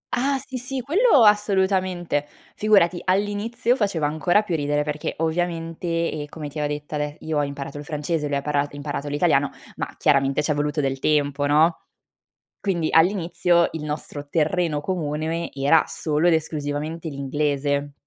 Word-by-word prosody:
Ah! 270 Hz, +3 st, +1 dB
Sì, 265 Hz, 0 st, -7 dB
sì! 255 Hz, +1 st, -4 dB
Quello 320 Hz, -, +4 dB
assolutamente. 190 Hz, -7 st, +2 dB, 0.3 s
Figurati, 190 Hz, -5 st, +3 dB
all'inizio 205 Hz, +6 st, 0 dB
faceva 200 Hz, -, 0 dB
ancora 175 Hz, +7 st, +2 dB
più 180 Hz, -5 st, -2 dB
ridere 145 Hz, -1 st, 0 dB
perché, 150 Hz, 0 st, -3 dB
ovviamente, 165 Hz, +1 st, -2 dB, 0.2 s
e 150 Hz, -1 st, -5 dB
come 150 Hz, -2 st, -7 dB
ti 150 Hz, -, -7 dB
avevo 150 Hz, -, 0 dB
detto 150 Hz, +1 st, -5 dB
ade 150 Hz, 0 st, -3 dB
io 155 Hz, -1 st, -1 dB
ho 145 Hz, -, +2 dB
imparato 140 Hz, 0 st, -5 dB
il -, -, -7 dB
francese, 150 Hz, 0 st, -2 dB
lui 145 Hz, -, -1 dB
ha 140 Hz, -, -2 dB
para 145 Hz, -1 st, 0 dB
imparato 145 Hz, 0 st, -5 dB
l'italiano, 145 Hz, +1 st, +2 dB, 0.3 s
ma -, -, -3 dB
chiaramente 140 Hz, +1 st, +2 dB
c'è 150 Hz, -, +1 dB
voluto 150 Hz, +1 st, -1 dB
del 135 Hz, -1 st, -1 dB
tempo, 145 Hz, -1 st, +1 dB
no. 155 Hz, +3 st, +3 dB, 0.8 s
Quindi 170 Hz, -5 st, 0 dB
all'inizio 170 Hz, 0 st, +3 dB
il 160 Hz, -, -5 dB
nostro 150 Hz, -1 st, -5 dB
terreno 160 Hz, 0 st, +1 dB
comune 160 Hz, -1 st, -2 dB
era 140 Hz, +4 st, +4 dB
solo 155 Hz, +2 st, 0 dB
ed 170 Hz, -, +5 dB
esclusivamente 155 Hz, +1 st, -3 dB
l'inglese. 145 Hz, 0 st, -1 dB
155 Hz, 155 wpm, -23 LUFS, 145-180 Hz, 0.8 s, ed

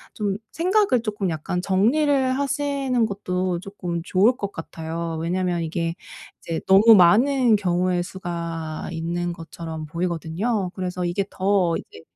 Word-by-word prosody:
좀 205 Hz, -2 st, -1 dB
생각을 365 Hz, -, +2 dB
조금 205 Hz, -4 st, -2 dB
약간 165 Hz, +2 st, -3 dB
정리를 260 Hz, -, +2 dB
하시는 280 Hz, -4 st, 0 dB
것도 185 Hz, -3 st, -2 dB
쪼끔 180 Hz, -4 st, -5 dB
좋을 195 Hz, +7 st, +3 dB
것 200 Hz, -1 st, -4 dB
같아요. 165 Hz, 0 st, -5 dB
왜냐하면 175 Hz, +1 st, -1 dB
이게 165 Hz, +1 st, -2 dB, 0.5 s
이제 165 Hz, -1 st, -3 dB
너무 210 Hz, +4 st, +8 dB
많은 230 Hz, +6 st, +5 dB
경우의 180 Hz, -2 st, +1 dB
수가 170 Hz, -3 st, -5 dB
있는 175 Hz, +1 st, -2 dB
것처럼 165 Hz, -2 st, -7 dB
보이거든요. 180 Hz, +5 st, -2 dB
그래서 180 Hz, -1 st, -3 dB
이게 175 Hz, +3 st, 0 dB
더 190 Hz, -3 st, +1 dB
이제 80 Hz, -, -11 dB
185 Hz, 290 characters per minute, -23 LUFS, 170-215 Hz, 0.5 s, 너무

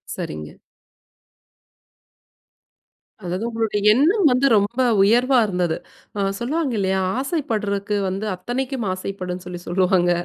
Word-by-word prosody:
சரிங்க. 75 Hz, 0 st, -7 dB, 2.6 s
அதாவது 180 Hz, +5 st, -3 dB
உங்களுடைய 225 Hz, -3 st, -1 dB
எண்ணம் 340 Hz, -, +3 dB
வந்து 250 Hz, +2 st, +2 dB
ரொம்ப 205 Hz, +4 st, +1 dB, 0.3 s
உயர்வா 245 Hz, +5 st, +4 dB
இருந்தது. 180 Hz, -4 st, -1 dB, 0.4 s
ஆ -, -, -2 dB, 0.2 s
சொல்லுவாங்க 275 Hz, +2 st, -1 dB
இல்லையா? 190 Hz, 0 st, +1 dB, 0.2 s
ஆசைப்பட்றதுக்கு 215 Hz, -, -2 dB
வந்து 195 Hz, +3 st, -3 dB
அத்தனைக்கும் 245 Hz, +4 st, -3 dB
ஆசைப்படும்ன்னு 185 Hz, -1 st, -5 dB
சொல்லி 175 Hz, -1 st, -7 dB
சொல்லுவாங்க. 180 Hz, 0 st, +2 dB
205 Hz, 100 wpm, -21 LUFS, 185-250 Hz, 2.6 s, உயர்வா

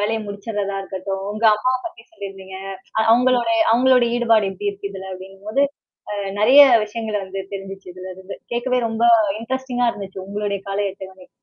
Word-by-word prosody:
வேலையை 220 Hz, +2 st, 0 dB
முடிச்சுடுறதா 200 Hz, -1 st, -4 dB
இருக்கட்டும், 195 Hz, 0 st, -5 dB
உங்க 215 Hz, +2 st, -4 dB
அம்மாவை 255 Hz, +4 st, 0 dB
பத்தி 230 Hz, -9 st, -10 dB
சொல்லியிருந்தீங்க. 195 Hz, -7 st, -8 dB, 0.4 s
அ -, -, +4 dB
அவங்களுடைய 240 Hz, -1 st, +3 dB
அவங்களுடைய 250 Hz, 0 st, +4 dB
ஈடுபாடு 225 Hz, -4 st, +3 dB
எப்படி 205 Hz, +2 st, -2 dB
இருக்கு. 200 Hz, 0 st, -7 dB
இதுல 190 Hz, 0 st, -7 dB
அப்படிங்கும்போது 195 Hz, +8 st, -2 dB, 0.5 s
அ -, -, -2 dB, 0.3 s
நிறைய 255 Hz, +7 st, +8 dB, 0.2 s
விஷயங்கள 215 Hz, 0 st, -4 dB
வந்து 190 Hz, +1 st, -7 dB
தெரிஞ்சுச்சு 195 Hz, -1 st, -7 dB
இதுலேருந்து. 185 Hz, +1 st, -9 dB, 0.2 s
கேட்கவே 250 Hz, +1 st, 0 dB
ரொம்ப 225 Hz, +1 st, -1 dB, 0.4 s
இன்ட்ரஸ்டிங்கா 245 Hz, 0 st, -1 dB
இருந்துச்சு, 190 Hz, -2 st, -8 dB
உங்களுடைய 205 Hz, -1 st, -2 dB
காலை 200 Hz, +1 st, 0 dB
அட்டவணை. 190 Hz, -1 st, -12 dB
205 Hz, 145 wpm, -21 LUFS, 195-235 Hz, 0.5 s, நிறைய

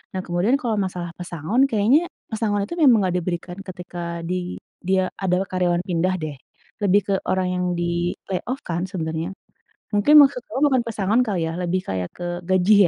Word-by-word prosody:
Nah -, -, 0 dB
kemudian 175 Hz, +9 st, +2 dB
kalau 230 Hz, -3 st, 0 dB
masalah 175 Hz, -2 st, -5 dB
pesangon, 180 Hz, -, +1 dB
kayaknya 230 Hz, +8 st, +4 dB, 0.3 s
pesangon 210 Hz, -2 st, 0 dB
itu 340 Hz, -, -6 dB
memang 255 Hz, -6 st, +7 dB
nggak 180 Hz, -, -1 dB
diberikan 175 Hz, +1 st, -4 dB
ketika 180 Hz, -1 st, -8 dB, 0.3 s
di 180 Hz, -, 0 dB, 0.5 s
dia 190 Hz, 0 st, +2 dB
adalah 185 Hz, +1 st, +1 dB
karyawan 180 Hz, -1 st, +1 dB
pindah 180 Hz, +1 st, +1 dB
deh, 150 Hz, -2 st, -4 dB, 0.5 s
lebih 200 Hz, +1 st, +4 dB
ke 200 Hz, -, +1 dB, 0.2 s
orang 185 Hz, -1 st, +1 dB
yang 180 Hz, 0 st, 0 dB
di-layoff 175 Hz, +8 st, -2 dB
kan 170 Hz, 0 st, -1 dB
sebenarnya. 165 Hz, -1 st, -3 dB, 0.6 s
Mungkin 210 Hz, +9 st, +4 dB
maksud 270 Hz, -3 st, +4 dB
kamu 265 Hz, -, -2 dB
bukan 260 Hz, -2 st, +3 dB
pesangon 215 Hz, +1 st, +1 dB
kali 200 Hz, -6 st, -1 dB
ya, -, -, -4 dB
lebih 180 Hz, +1 st, 0 dB
kayak 95 Hz, -2 st, -2 dB
ke 175 Hz, -, -7 dB, 0.3 s
gaji 185 Hz, +3 st, +4 dB
185 Hz, 170 wpm, -23 LUFS, 175-210 Hz, 0.6 s, memang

